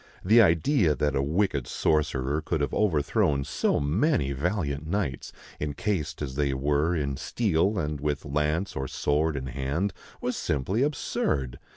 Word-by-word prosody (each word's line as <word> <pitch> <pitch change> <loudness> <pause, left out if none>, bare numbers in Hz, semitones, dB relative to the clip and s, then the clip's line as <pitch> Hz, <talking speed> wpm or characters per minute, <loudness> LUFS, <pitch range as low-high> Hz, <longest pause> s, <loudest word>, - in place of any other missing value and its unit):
The 110 +5 +7
idea 85 - +3
that 75 -1 0
a 70 - +2
wicked 75 -2 0
sorcerer 75 -2 0
could 80 - -2
have 70 - -1
overthrown 75 -6 +2
so 65 -1 0
many 75 - +1
valiant 75 -1 -2
knights, 85 -7 -2 0.3
encased 75 0 -2
as 65 -3 -4
they 70 -1 0
were 75 +5 +1
in 70 -4 -2
steel 100 - +1
and 75 -4 -2
with 75 -1 -2
lance 75 +6 -1
or 65 0 -2
sword 75 +4 0
in 65 - -4
hand, 70 +9 -2 0.3
was - - -2
simply 75 - -1
absurd. 70 - -1
75 Hz, 150 wpm, -27 LUFS, 70-90 Hz, 0.3 s, The